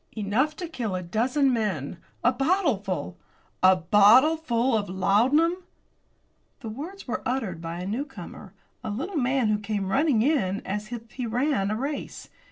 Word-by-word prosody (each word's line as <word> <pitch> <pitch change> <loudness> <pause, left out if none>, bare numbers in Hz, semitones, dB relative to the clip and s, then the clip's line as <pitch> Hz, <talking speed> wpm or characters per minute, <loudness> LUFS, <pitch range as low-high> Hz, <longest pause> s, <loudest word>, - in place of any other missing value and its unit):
"Enough 225 +9 0
to 355 - -5
kill 235 - -3
a 185 - -3
dozen 250 - +1
men. 190 - -2 0.3
A 245 - +4
bottleful." 245 - 0 0.4
"A 185 0 +6
bottleful 235 - +4
of 205 -3 -1
laudanum!" 245 - +2 1.0
The 225 - -6
words 315 - -8
were 245 - -3
uttered 225 -10 -2
by 170 +1 -5
a - - -5
newcomer 210 -4 -6 0.3
a - - -4
little 315 - -4
man 260 -3 +1
who 210 -1 +1
came 205 -2 -3
running 270 -3 +3
in 235 -10 0
as 210 +3 -4
if 230 -2 -7
he 250 -2 -4
ran 245 -3 0
a 215 - -1
race. 280 +6 -5
230 Hz, 155 wpm, -26 LUFS, 200-275 Hz, 1.0 s, A